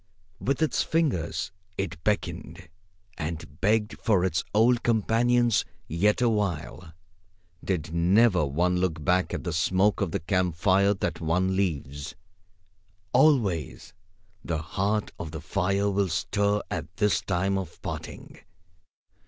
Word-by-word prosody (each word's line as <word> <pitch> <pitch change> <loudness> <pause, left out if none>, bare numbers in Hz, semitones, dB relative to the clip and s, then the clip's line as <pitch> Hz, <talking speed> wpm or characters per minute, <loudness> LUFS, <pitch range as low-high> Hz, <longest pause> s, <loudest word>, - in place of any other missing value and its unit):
With 140 +5 0
its 155 - +1
fingers 95 - -1 0.3
it 85 -4 -4
beckoned 105 -6 -3 0.5
and 75 -3 -6
begged 105 +1 +1
for 95 -5 +2
its 80 -4 0
old 115 +3 +4
companions 120 +1 +2 0.2
yet 105 +9 +1
a - - +4
while. 90 -6 -2 0.7
Did 80 -4 -2
never 90 +2 +4
one 85 +6 +1
look 85 -4 -1
back 90 +2 +2
at - - -4
the 85 - -3
smoke 95 +7 +2
of 100 - +1
the - - -2
camp 90 0 0
fire 100 +4 +3
that 95 - -3
one 90 +4 +1
leaves? 75 -5 -2 1.0
Always, 115 - +2 0.5
the 80 - -2
heart 100 +6 -1
of 80 - -5
the 80 0 -6
fire 100 +4 0
will 100 -1 +1
stir 100 +5 0
at 80 +1 -5
this 95 -5 +2
time 95 +2 0
of 95 -2 -5
parting. - - -7
95 Hz, 130 wpm, -27 LUFS, 85-105 Hz, 1.0 s, old